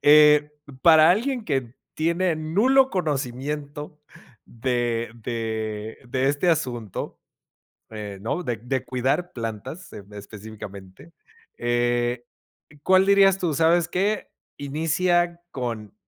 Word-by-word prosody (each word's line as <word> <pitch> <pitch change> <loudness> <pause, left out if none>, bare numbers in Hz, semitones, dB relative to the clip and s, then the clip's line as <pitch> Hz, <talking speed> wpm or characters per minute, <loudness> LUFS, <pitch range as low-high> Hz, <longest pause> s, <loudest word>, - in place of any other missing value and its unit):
eh, 150 0 +6 0.2
p 140 - -12
para 160 -1 +7
alguien 240 +5 0
que 135 - -2 0.2
tiene 170 +1 +1
nulo 245 +13 +3
conocimiento 145 -1 -3 0.5
de 120 -1 -2
de 110 -2 -4
de 130 +2 +1
este 145 +5 +2
asunto, 120 - -3 0.7
eh, 105 -2 -7
¿no? 115 - -2
De 120 - -2
de 130 +3 -3
cuidar 130 +8 -1
plantas 115 - -6
en 100 0 -11
específicamente, 100 - -10 0.5
eh, 120 0 0 0.6
¿cuál 185 0 +5
dirías 195 -1 +5
tú 170 -4 0
sabes 165 +3 +3
qué, 200 +3 -1 0.3
inicia 170 +4 0
con 115 -5 -5
140 Hz, 110 wpm, -24 LUFS, 115-170 Hz, 0.7 s, para